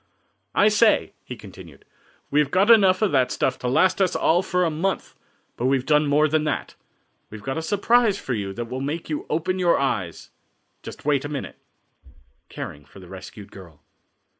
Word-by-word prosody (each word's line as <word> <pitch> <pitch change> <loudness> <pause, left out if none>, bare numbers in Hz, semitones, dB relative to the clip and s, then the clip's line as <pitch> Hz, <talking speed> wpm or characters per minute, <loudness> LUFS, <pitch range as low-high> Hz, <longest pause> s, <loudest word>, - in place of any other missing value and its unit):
"I 205 - +5
say," 215 +1 +3
he 125 - -8
continued, 95 -8 -14 0.5
"we 145 - +3
have 150 -2 +2
got 195 +8 +4
enough 195 -3 +5
of 210 - +2
that 130 -3 +2
stuff - - -1
to 125 - -4
last 185 +9 +2
us 185 - +1
all 175 +2 +2
for 180 -1 0
a 165 - +1
month, 180 +5 -2 0.4
but 125 - 0
we've 135 -1 +1
done 150 -1 +3
more 150 +2 +3
than 155 0 0
that; 150 - -3 0.6
we 110 - -9
have 105 - -15
got 135 0 -2
a - - -4
surprise 205 +4 +2
for 130 - -4
you 100 -4 -3
that 120 +3 -5
will 130 +3 -6
make 155 +4 -4
you 150 - -4
open 175 +4 -1
your 175 -2 +3
eyes. 100 -11 -3 0.5
Just - - -11
wait 145 -2 +1
a 145 - -5
minute." 145 -2 -6 0.9
Caring 70 - -8
for 75 +7 -16
the 90 - -13
Rescued 95 +2 -11
Girl. 85 -7 -14
145 Hz, 195 wpm, -23 LUFS, 120-180 Hz, 0.9 s, I